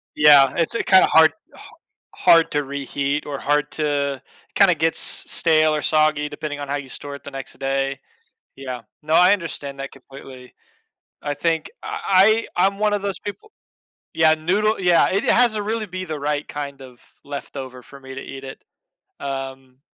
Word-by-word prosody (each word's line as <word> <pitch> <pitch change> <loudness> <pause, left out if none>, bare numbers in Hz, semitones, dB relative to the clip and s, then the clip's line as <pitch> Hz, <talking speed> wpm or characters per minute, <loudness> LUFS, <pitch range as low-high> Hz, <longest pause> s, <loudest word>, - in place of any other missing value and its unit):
Yeah, 145 -3 +6
it's, 165 +5 0
uh, - - +1
kinda 190 -1 +6
hard 160 0 +5 0.2
ha - - -14 0.4
hard 165 -1 +5
to 145 0 0
reheat 140 +1 -3
or 140 -2 -4
hard 145 +1 0
to 140 -3 -1 0.3
kinda 195 -3 +5
gets 160 +1 0
stale 155 -2 +1
or 150 - -2
soggy 155 -1 +2
depending 145 -1 -6
on 145 - -5
how 140 - -2
you 140 -2 -6
store 145 +2 -7
it - - -13
the - - -8
next 135 -1 -7
day. 135 0 -1 0.6
Yeah, 130 -3 -7 0.2
no, 155 +1 -3
I 180 +4 +6
understand 145 -7 -5
that 135 - -6
completely. 135 -1 -13 0.7
I 145 -1 -2
think 165 - -1
I 220 - +2
I 180 - +4
I'm 195 0 -2
one 210 0 +1
of 205 - -1
those 200 -1 -2
people 415 - -9 0.6
Yeah, 160 -1 +4
noodle 195 +8 0
yeah, 175 -2 +4
it 195 +2 0
has 240 -2 +3
a 210 - -2
really 220 +1 -2
be 185 -1 -6
the 155 -3 -5
right 145 +1 -2
kind 140 -2 -6
of 125 -2 -14 0.2
leftover 135 -2 -8
for 140 - -14
me 130 -1 -10
to 135 - -6
eat 135 0 -9
it. 135 0 -9 0.6
Um 135 -1 -6
150 Hz, 180 wpm, -21 LUFS, 135-180 Hz, 0.7 s, Yeah